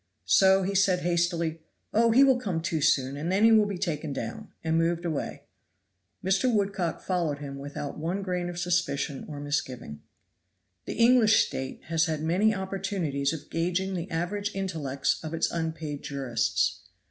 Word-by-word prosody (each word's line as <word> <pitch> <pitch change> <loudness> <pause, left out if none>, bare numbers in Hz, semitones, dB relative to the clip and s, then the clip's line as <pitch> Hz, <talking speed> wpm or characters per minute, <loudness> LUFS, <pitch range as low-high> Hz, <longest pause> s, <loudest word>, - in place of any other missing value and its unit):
So 190 0 +5
he 195 +2 -1
said 190 -2 +3
hastily, 170 -2 0 0.3
"Oh, 230 +2 +4
he 250 +5 +6
will 265 -2 +4
come 195 -9 -2
to 160 -2 -1
soon, 135 -1 +2
and 155 +5 -3
then 195 +3 +2
he 225 - +7
will 215 -2 +5
be 200 -2 -3
taken 155 -3 -2
down;" 115 -4 -5 0.2
and 160 0 0
moved 170 +1 +1
away. 160 -4 -3 0.8
Mr. 195 +7 +2
Woodcock 195 -5 -1
followed 170 -6 0
him 140 -1 -7
without 145 +1 -6
one 175 +6 -2
grain 180 -2 -2
of 175 - -7
suspicion 175 -6 -1
or 145 -2 -6
misgiving. 130 - -4 0.8
The - - -5
English 230 -2 +5
State 130 0 -6
has 165 0 +1
had 155 -2 -2
many 185 +7 +3
opportunities 190 -7 -2
of 160 -3 -7
gauging 180 +3 -1
the 180 0 -4
average 200 +5 -2
intellects 160 -10 -1
of 160 +1 -4
its 165 - 0
unpaid 160 -3 -3
jurists. 130 -5 0
170 Hz, 165 wpm, -27 LUFS, 150-195 Hz, 0.8 s, he